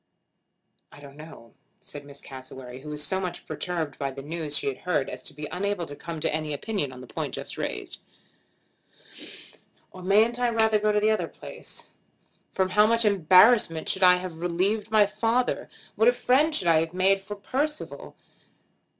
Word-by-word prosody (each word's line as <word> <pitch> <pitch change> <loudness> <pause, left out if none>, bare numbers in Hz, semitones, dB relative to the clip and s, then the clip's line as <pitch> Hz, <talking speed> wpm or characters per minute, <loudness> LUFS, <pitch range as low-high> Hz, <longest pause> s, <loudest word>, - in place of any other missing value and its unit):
"I - - -13
don't 140 -1 -13
know," 150 -6 -13 0.3
said 145 -1 -8
Miss 140 0 -11
Cassewary, 130 -1 -10
who 150 - -9
was 150 0 -2
so 190 +5 -1
much 185 -2 -5
perturbed 165 -6 -4
by 140 - -1
the 135 0 -8
news 155 -1 -2
she - - -2
had 135 -2 -2
heard 180 -6 -1
as 125 - -6
to - - -8
be 150 0 -5
unable 190 0 -2
to 145 - -9
come 165 +2 -6
to 155 - 0
any 155 -1 -2
opinion 145 -2 -2
on 125 0 -10
the - - -9
point - - -4
just - - -6
raised. - - -4 1.9
"Or 185 - -11
mayn't 215 +6 +3
I 245 -1 +2
rather 220 -2 +3
go 215 0 +2
to 210 - +2
the 215 +1 +3
other 215 - 0
place? - - -8 0.6
From 190 -1 0
how 210 +3 +5
much 230 0 +3
embarrassment 185 -2 +5
should 190 - -2
I 180 -1 +8
have 180 -3 -6
relieved 195 +5 0
my 215 -1 +5
father! 230 +4 0 0.3
What 455 - +3
a - - +6
friend 275 - +3
I - - -4
should 190 - 0
have 165 0 +3
made 195 +1 +3
for 205 +1 -7
Percival! 285 +9 -4
180 Hz, 185 wpm, -26 LUFS, 150-215 Hz, 1.9 s, I